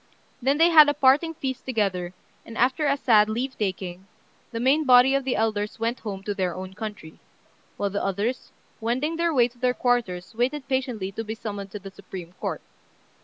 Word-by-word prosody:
Then 275 +3 +2
they 330 +2 +6
had 305 -3 +9
a 290 - 0
parting 295 +4 +3
feast 265 -3 -4
together, 190 -7 -1 0.3
and, 230 - -10
after 260 +5 +2
a 280 0 +2
sad 215 -5 +4
leave 255 +5 -2
taking, 190 -2 -4 0.4
the 230 - -4
main 270 +6 +3
body 255 0 +6
of 275 -1 0
the 260 - 0
elders 215 -1 -1
went 230 +2 -1
home 195 -3 -6
to 205 - -2
their 185 -4 -2
own 185 0 -7
country; 210 -6 -8 0.6
while 200 -1 -1
the 200 - -2
others, 205 +6 -2 0.3
wending 260 +8 -1
their 335 0 +1
way 245 -6 +4
to 245 0 -22
their 250 0 +1
quarters 230 -7 -1
waited 265 +5 -1
patiently 250 -8 -2
to 225 +3 -5
be 220 0 -5
summoned 205 -3 -6
to 210 - -7
the 195 0 -10
Supreme 185 -3 -10
Court. - - -3
230 Hz, 195 wpm, -25 LUFS, 200-265 Hz, 0.6 s, had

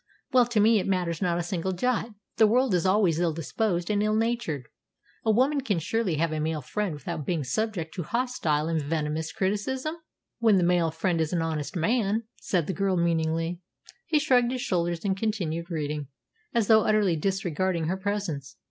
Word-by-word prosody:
"Well, 250 -2 +5
to 240 -3 +1
me 220 +1 +5
it - - -3
matters 180 -3 -1
not 175 -3 +1
a 175 - -1
single 180 +1 -2
jot. 235 +4 0 0.3
The 220 - +6
world 250 +1 +3
is 180 0 +2
always 185 -5 +3
ill 170 -2 +1
disposed 175 - -1
and 205 -1 +1
ill 215 0 +1
natured. 220 - -1 0.6
A 225 - 0
woman 265 +6 +3
can 210 -8 0
surely 190 +2 0
have 165 +1 0
a 155 - -2
male 155 -1 -2
friend 205 +3 -2
without 150 +2 -5
being 160 0 -1
subject 170 - -2
to 185 - -4
hostile 170 -7 0
and 165 -1 0
venomous 155 +1 -2
criticism?" 235 +10 -1 0.5
"When 220 -4 +5
the 180 - +3
male 175 -1 +3
friend 165 +1 0
is 160 +2 -1
an 170 -2 +1
honest 155 -1 -3
man," 215 +4 +1
said 175 -5 0
the 190 - -2
girl 190 +2 0
meaningly. 165 0 0 0.5
He 315 - +3
shrugged 250 -5 +3
his 255 -1 -3
shoulders 170 -2 -1
and 190 -1 +1
continued 185 -6 -2
reading, 150 -3 -3 0.4
as 235 -3 +2
though 220 +1 +6
utterly 210 -5 +3
disregarding 185 0 -1
her 175 +4 0
presence. 190 -9 -3
180 Hz, 190 wpm, -27 LUFS, 165-215 Hz, 0.6 s, The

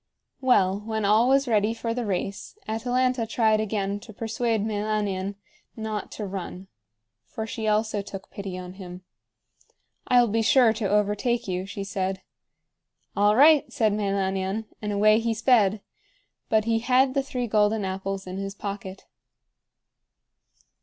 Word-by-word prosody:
Well, 200 -7 +3
when 220 0 -3
all 220 +5 +4
was 275 0 +3
ready 220 -1 +2
for 230 0 -3
the 240 -2 -3
race, 195 - -4
Atalanta 245 +1 0
tried 220 -1 +2
again 205 -1 -2
to 220 - -12
persuade 225 0 -1
Meilanion 205 -2 -2 0.4
not 220 -2 -4
to 210 - -5
run, 190 -1 -7 0.6
for 220 - -5
she 220 0 -4
also 215 -1 +1
took 200 0 -9
pity 195 -2 -6
on 180 0 -8
him. 185 -1 -10 1.0
"I'll 245 -1 +5
be 225 +1 +1
sure 230 0 +5
to 215 -3 -2
overtake 210 +4 +1
you," 185 0 -3
she 200 0 -5
said. 190 -1 -3 0.9
"All 205 +1 +4
right!" 295 +3 +6
said 220 -7 +1
Meilanion, 195 0 -1 0.2
and 210 -1 -3
away 215 +2 +4
he 230 0 -1
sped; 220 -3 +3 0.7
but 220 -1 +2
he 225 0 +1
had 260 +2 +3
the 275 - +2
three 255 -2 -3
golden 210 -1 +2
apples 190 +1 -4
in 185 0 -6
his 195 0 -5
pocket. 195 -2 -7
210 Hz, 145 wpm, -25 LUFS, 195-225 Hz, 1.0 s, right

